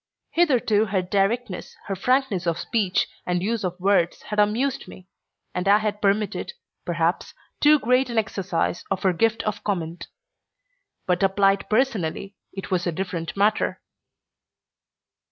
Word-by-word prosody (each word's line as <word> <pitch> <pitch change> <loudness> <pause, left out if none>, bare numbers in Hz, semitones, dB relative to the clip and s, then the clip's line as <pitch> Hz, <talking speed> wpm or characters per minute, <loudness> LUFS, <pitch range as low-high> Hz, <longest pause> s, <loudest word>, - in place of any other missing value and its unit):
Hitherto 245 -10 +3
her 190 -3 0
directness, 195 +2 -1
her 195 - -3
frankness 230 -4 +1
of 170 -1 +1
speech 205 -4 0 0.2
and 180 0 -1
use 225 +1 -1
of 180 0 -3
words, 185 -2 +1
had 210 - -3
amused 235 +6 +1
me, 185 - -13 0.5
and 180 +1 -2
I 200 +1 +7
had 210 -1 -2
permitted, 205 - 0 0.3
perhaps, - - -1 0.2
too 300 +1 +6
great 250 0 +2
an 235 - -3
exercise 190 -5 -1
of 195 -1 -2
her 190 -2 +3
gift 225 +5 +1
of 215 0 -3
comment; 175 -4 -3 1.0
but 180 -1 +1
applied 195 0 +2
personally 210 -5 0 0.2
it 195 0 -8
was 180 -1 0
a - - +1
different 170 0 -4
matter. 210 +2 +1
200 Hz, 140 wpm, -24 LUFS, 185-220 Hz, 1.0 s, I